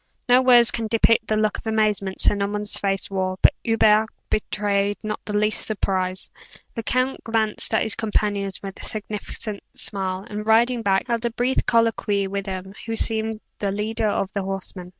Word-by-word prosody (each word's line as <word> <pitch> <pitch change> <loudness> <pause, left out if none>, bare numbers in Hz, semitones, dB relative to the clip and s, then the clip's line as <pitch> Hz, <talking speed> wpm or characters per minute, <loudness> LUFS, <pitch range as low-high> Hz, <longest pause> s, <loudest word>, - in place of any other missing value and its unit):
No 250 +1 +6
words 245 -2 +6
can 230 -2 -3
depict 225 0 +3
the 215 - +1
look 215 0 0
of - - -10
amazement 210 -3 0
Sir - - +6
Norman's 205 +1 +1
face 195 -1 0
wore; 185 -1 -1
but - - +7
Hubert 220 -1 +4 0.2
betrayed 205 -1 0
not 215 0 -4
the 210 -1 -1
least 210 +1 +1
surprise. 185 -3 -1 0.4
The 230 - -4
count 255 +3 -1
glanced 220 -2 0
at - - +2
his 220 - 0
companions 205 -3 -2
with 195 -1 -7
a - - -10
significant 210 0 -5
smile, 190 -1 -2
and 210 0 -5
riding 235 +2 +3
back, 195 -1 +1
held 235 -1 -1
a - - +2
brief 245 +3 -1
colloquy 225 -3 +2
with 200 +1 -4
him 190 0 -6
who 225 - -2
seemed 220 -1 0 0.2
the 200 - -1
leader 215 +2 -1
of 195 -1 -2
the 200 - -1
horsemen. 190 -1 -3
210 Hz, 180 wpm, -23 LUFS, 200-225 Hz, 0.4 s, but